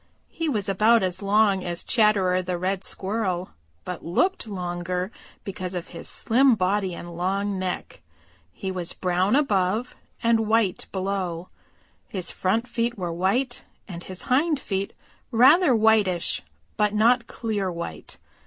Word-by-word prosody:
He 330 -2 -2
was 210 -7 -1
about 215 +4 +4
as 185 +1 -1
long 200 -1 +3
as 175 -1 -3
Chatterer 200 -5 +3
the 180 -1 -3
Red 190 +2 -2
Squirrel 190 -3 -2 0.3
but 180 -1 -6
looked 300 - 0
longer 180 -1 -3 0.3
because 185 -3 -5
of 175 - -5
his 170 - -6
slim 255 +2 +3
body 190 -1 0
and 175 0 -8
long 195 +3 -1
neck. 185 -1 -4 0.5
He 190 - -5
was 180 -2 -4
brown 185 +4 +1
above 215 -4 +1 0.3
and 225 -1 +3
white 220 -4 +1
below. 185 -3 -3 0.6
His 185 -3 -2
front 220 +6 0
feet 235 -1 -1
were 175 -3 -3
white, 230 +9 0 0.2
and 175 -3 -7
his 185 0 -6
hind 290 +3 +2
feet 195 -5 -3 0.4
rather 265 +5 +6
whitish, 215 -5 +2 0.4
but 210 0 +1
not 235 +2 +4
clear 205 -5 -2
white. 170 - -7
195 Hz, 140 wpm, -25 LUFS, 180-225 Hz, 0.6 s, rather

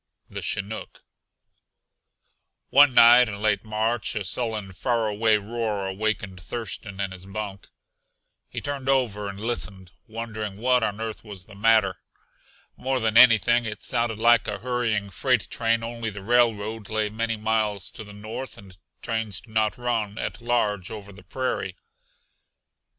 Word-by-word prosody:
THE - - -5
CHINOOK 100 +2 -4 1.7
One 140 -2 +7
night 120 +1 +8
in 100 -1 -6
late 105 -1 +1
March 110 +2 0
a 105 - -1
sullen, 105 -1 -2
faraway 110 +1 +1
roar 105 -1 -3
awakened 95 -1 -2
Thurston 100 -1 -5
in 100 -1 -2
his 95 0 -9
bunk. 100 -1 -6 0.8
He - - -5
turned 140 -2 -3
over 110 -7 +1
and 100 0 -8
listened, 100 -5 -3 0.2
wondering 110 -3 -5
what 125 +1 +3
on 105 -1 -1
earth 110 -1 -5
was 100 -4 -9
the 105 - -15
matter. 105 -2 +3 0.8
More 130 0 -1
than 110 -2 0
anything 120 -1 +6
it 105 -2 -6
sounded 115 -3 0
like 115 +1 +4
a 105 - -2
hurrying 115 -3 -1
freight 125 -2 +1
train 115 -1 +1
only 115 -1 -4
the 100 -2 -9
railroad 110 -2 +1
lay 110 -1 0
many 115 +1 -2
miles 105 -2 0
to - - -8
the 105 - -12
north, 110 +6 -7
and 95 -2 -14 0.3
trains 110 -4 -2
do 110 - -18
not 110 -1 +1
run 115 -4 -2
at 110 - -4
large 105 -6 0
over 100 -2 -8
the 100 - -14
prairie. 130 -7 -3
110 Hz, 150 wpm, -25 LUFS, 100-115 Hz, 1.7 s, night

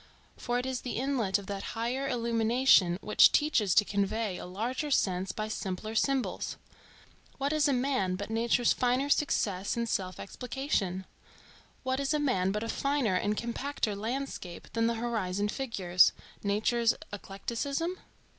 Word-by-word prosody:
for 245 0 -2
it 250 - -2
is 260 -2 -2
the 250 - -4
inlet 240 -7 +1
of 200 - -9
that 200 0 -4 0.2
higher 250 +4 -1
illumination 230 -6 +3
which 210 - +6
teaches 230 - +2
to 210 - +6
convey 205 0 -1
a 180 - -7
larger 240 - -3
sense 185 -8 +1
by 215 0 -4
simpler 215 0 -4
symbols. 270 +3 0 0.8
What 280 +2 0
is 305 -1 +3
a - - +3
man 250 -8 +1
but 200 +3 -5
nature's 230 +1 +2
finer 255 +3 +1
success 200 -10 +1
in 235 - 0
self 185 -5 -2
explication? 210 -6 -2 0.8
What 260 0 0
is 280 +2 0
a - - +1
man 190 -10 +1
but 210 +2 -2
a - - -3
finer 275 -4 0
and 205 +3 0
compacter 235 -2 -2
landscape 220 -5 -5
than 230 0 +2
the 230 - 0
horizon 210 -4 -1
figures,—nature's 210 +1 +1 0.2
eclecticism? 275 - -3
230 Hz, 145 wpm, -30 LUFS, 200-265 Hz, 0.8 s, which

